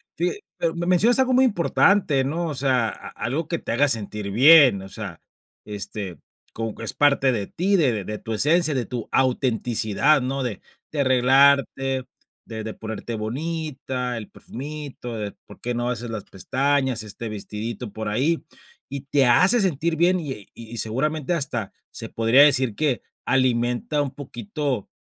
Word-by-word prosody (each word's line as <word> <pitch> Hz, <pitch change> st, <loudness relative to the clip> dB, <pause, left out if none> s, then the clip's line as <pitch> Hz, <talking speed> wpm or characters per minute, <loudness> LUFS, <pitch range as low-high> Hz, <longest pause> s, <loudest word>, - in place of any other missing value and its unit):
fi 175 Hz, +2 st, 0 dB, 0.3 s
pero 165 Hz, -1 st, 0 dB
me 170 Hz, 0 st, -3 dB
mencionas 210 Hz, +8 st, +4 dB
algo 260 Hz, -1 st, +3 dB
muy 260 Hz, -, +5 dB
importante, 190 Hz, -, +3 dB
¿no?, 165 Hz, +5 st, -2 dB
o 150 Hz, -, -4 dB
sea, 130 Hz, -3 st, +2 dB
a -, -, -8 dB
algo 150 Hz, +6 st, -3 dB
que 170 Hz, -, -1 dB
te -, -, -4 dB
haga 145 Hz, +4 st, +3 dB
sentir 105 Hz, -3 st, -1 dB
bien, 135 Hz, -2 st, +7 dB
o 95 Hz, -, -9 dB
sea, 95 Hz, -3 st, -7 dB, 0.5 s
este, 100 Hz, -3 st, -5 dB, 0.4 s
como 115 Hz, -1 st, -4 dB
que 115 Hz, -, -8 dB
es -, -, 0 dB
parte 140 Hz, -3 st, +3 dB
de 100 Hz, -3 st, -2 dB
ti, 195 Hz, +4 st, 0 dB
de 125 Hz, -, +1 dB
de 105 Hz, -, -4 dB
tu 115 Hz, -, -8 dB
esencia, 155 Hz, +7 st, +3 dB
de 125 Hz, -3 st, -1 dB
tu 120 Hz, -3 st, -6 dB
autenticidad, 125 Hz, +1 st, +2 dB
¿no?, 135 Hz, +2 st, -2 dB
de 120 Hz, -6 st, -4 dB, 0.3 s
de 150 Hz, -, -1 dB
arreglarte, 135 Hz, 0 st, +3 dB, 0.4 s
de 110 Hz, -1 st, -6 dB
de 110 Hz, 0 st, -5 dB
ponerte 110 Hz, +1 st, -6 dB
bonita, 130 Hz, +1 st, -4 dB
el 110 Hz, -, -8 dB
perfumito, 140 Hz, -3 st, -8 dB
de 105 Hz, -2 st, -4 dB
por -, -, -14 dB
qué 120 Hz, 0 st, -3 dB
no 120 Hz, +1 st, -1 dB
haces 120 Hz, -1 st, -4 dB
las 110 Hz, -3 st, -5 dB
pestañas, 130 Hz, +4 st, -1 dB
este 110 Hz, +2 st, -7 dB
vestidito 105 Hz, +2 st, -6 dB
por 110 Hz, +1 st, -5 dB
ahí, 135 Hz, +11 st, 0 dB, 0.4 s
y 140 Hz, 0 st, -6 dB
te 140 Hz, 0 st, +2 dB
hace 180 Hz, -, +6 dB
sentir 165 Hz, -3 st, 0 dB
bien, 175 Hz, +1 st, +3 dB
y 130 Hz, -9 st, -7 dB
y 115 Hz, 0 st, -9 dB
seguramente, 145 Hz, +9 st, -1 dB
hasta 130 Hz, -, -3 dB, 0.2 s
se -, -, -7 dB
podría 115 Hz, +5 st, +5 dB
decir 130 Hz, -6 st, +3 dB
que 145 Hz, -3 st, 0 dB, 0.2 s
alimenta 125 Hz, +2 st, +1 dB
un 140 Hz, -2 st, -2 dB
poquito, 130 Hz, -2 st, -4 dB
130 Hz, 170 wpm, -23 LUFS, 115-150 Hz, 0.5 s, bien